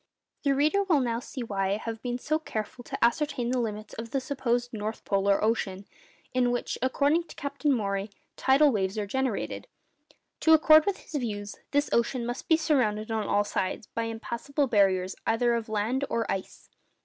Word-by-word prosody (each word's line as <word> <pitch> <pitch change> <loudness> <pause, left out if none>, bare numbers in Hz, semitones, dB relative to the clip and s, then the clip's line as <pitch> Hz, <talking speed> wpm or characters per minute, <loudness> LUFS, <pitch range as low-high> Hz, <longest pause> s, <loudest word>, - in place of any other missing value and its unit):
The 280 -2 +2
reader 305 +8 +3
will 345 -7 +3
now 235 -3 0
see 250 +1 -6
why 195 -3 -1
I - - 0
have 225 0 -6
been 245 -1 -2
so 310 +5 -1
careful 245 -3 -5
to - - +1
ascertain 250 -1 0
the 255 - +1
limits 215 -2 -4
of 230 +1 -6
the 270 +2 0
supposed 245 -3 -1
north 215 0 -4
polar 200 0 +2
ocean, 200 -3 0 0.5
in 250 -1 +3
which, 245 0 -1
according 285 +6 +2
to - - -13
Captain 280 +1 -1
Maury, 200 -4 -1 0.3
tidal 275 +2 +4
waves 195 -2 -1
are 210 - -1
generated. 260 +1 -2 0.7
To 320 - +5
accord 310 +1 +7
with 400 - +1
his - - -15
views, 210 -7 -3
this 290 +1 +1
ocean 235 +1 +1
must 245 +2 -5
be 320 - +5
surrounded 230 -9 +1
on 220 -1 -1
all 205 - +3
sides 190 0 -2
by 230 - -1
impassable 235 +5 -2
barriers 195 -5 +2
either 235 +1 +2
of 230 -1 -2
land 220 +6 0
or 230 -1 0
ice. 190 -1 -5
235 Hz, 185 wpm, -28 LUFS, 215-280 Hz, 0.7 s, accord